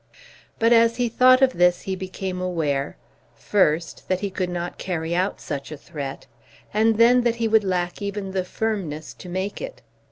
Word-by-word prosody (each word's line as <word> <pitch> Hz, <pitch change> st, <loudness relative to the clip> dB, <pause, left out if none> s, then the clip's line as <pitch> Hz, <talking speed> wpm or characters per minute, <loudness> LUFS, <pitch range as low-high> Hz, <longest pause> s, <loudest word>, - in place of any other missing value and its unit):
But 230 Hz, +1 st, +4 dB
as 230 Hz, 0 st, +5 dB
he 245 Hz, -1 st, 0 dB
thought 255 Hz, +3 st, +5 dB
of 260 Hz, -1 st, +4 dB
this 175 Hz, 0 st, +3 dB
he 190 Hz, -, -3 dB
became 185 Hz, 0 st, -5 dB
aware, 150 Hz, -6 st, -1 dB, 0.4 s
first 170 Hz, -4 st, 0 dB
that 185 Hz, 0 st, 0 dB
he 200 Hz, -1 st, -2 dB
could 185 Hz, -1 st, -2 dB
not 175 Hz, 0 st, -4 dB
carry 165 Hz, -2 st, -3 dB
out 185 Hz, +3 st, 0 dB
such 140 Hz, +1 st, -5 dB
a 155 Hz, -, -6 dB
threat, 140 Hz, -2 st, -7 dB, 0.5 s
and 220 Hz, +1 st, +3 dB
then 240 Hz, +2 st, +6 dB
that 240 Hz, -1 st, +1 dB
he 230 Hz, -1 st, 0 dB
would 220 Hz, -1 st, +4 dB
lack 180 Hz, -1 st, -2 dB
even 200 Hz, -1 st, -4 dB
the 190 Hz, -1 st, -1 dB
firmness 180 Hz, -6 st, -3 dB
to 180 Hz, -, -11 dB
make 190 Hz, +3 st, -3 dB
it. -, -, -7 dB
190 Hz, 185 wpm, -23 LUFS, 175-225 Hz, 0.5 s, then